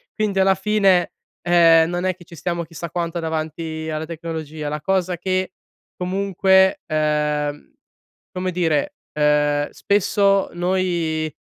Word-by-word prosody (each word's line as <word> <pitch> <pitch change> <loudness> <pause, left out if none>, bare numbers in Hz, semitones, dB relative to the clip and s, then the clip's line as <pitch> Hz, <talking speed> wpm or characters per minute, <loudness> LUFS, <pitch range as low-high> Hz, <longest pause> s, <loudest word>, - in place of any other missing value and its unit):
quindi, 210 -3 0
alla 190 0 +5
fine, 195 -3 +2 0.3
ehm, 165 -1 +5
non 175 +1 -2
è 185 - +1
che 180 - -16
ci 170 - -14
stiamo 170 +1 -3
chissà 165 0 -8
quanto 170 0 -2
davanti 160 0 -4
alla 155 0 -3
tecnologia. 160 -2 -6
La 150 +1 -3
cosa 185 +1 0
che 185 +1 -2 0.4
comunque, 190 0 +2
ehm, 150 -1 -1 0.6
come 185 0 -2
dire, 165 -5 0 0.2
ehm, 150 -1 +2
spesso 200 0 +1
noi, 175 -3 -1
170 Hz, 125 wpm, -21 LUFS, 155-185 Hz, 0.6 s, alla